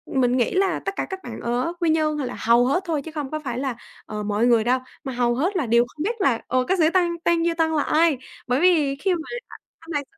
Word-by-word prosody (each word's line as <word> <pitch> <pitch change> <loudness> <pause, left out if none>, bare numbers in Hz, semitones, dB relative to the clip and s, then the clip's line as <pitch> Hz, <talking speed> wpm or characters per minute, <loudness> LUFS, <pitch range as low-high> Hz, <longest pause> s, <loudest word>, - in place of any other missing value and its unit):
mình 250 -1 +3
nghĩ 240 - +1
là 380 -2 +1
tất 390 - -1
cả - - -2
các 380 -1 -5
bạn 230 -2 -7
ở 245 +7 -1
Quy 340 - +1
Nhơn 310 -1 +1
là 270 -4 -3
hầu 235 +2 +4
hết 285 +9 +1
thôi, 320 -5 -1
chứ 320 - -9
không 295 -4 -5
có 310 - -2
phải 250 -6 -4
là, 265 -2 -2 0.3
ờ, 210 0 -5
mọi 210 +2 +1
người 235 -2 +4
đâu, 250 +3 +2 0.2
mà 265 -3 -4
hầu 240 -1 +1
hết 350 +10 0
là 315 - 0
đều 235 +1 +4
không 300 +5 -7
biết 450 +6 -1
là, 250 -8 +2
ờ, 255 0 +1
các 375 0 +1
sĩ 320 - +5
Tăng 345 -2 +1
Tăng 340 -1 +2
Duy 340 - +2
Tân 325 -1 +1
là 300 -2 +1
ai. 320 -2 +3 0.3
Bởi 250 +3 +1
vì 315 -6 +3
khi 375 +7 0
mà - - -4 0.6
anh 330 +1 -12
này 290 -2 -1
290 Hz, 270 wpm, -23 LUFS, 245-335 Hz, 0.6 s, sĩ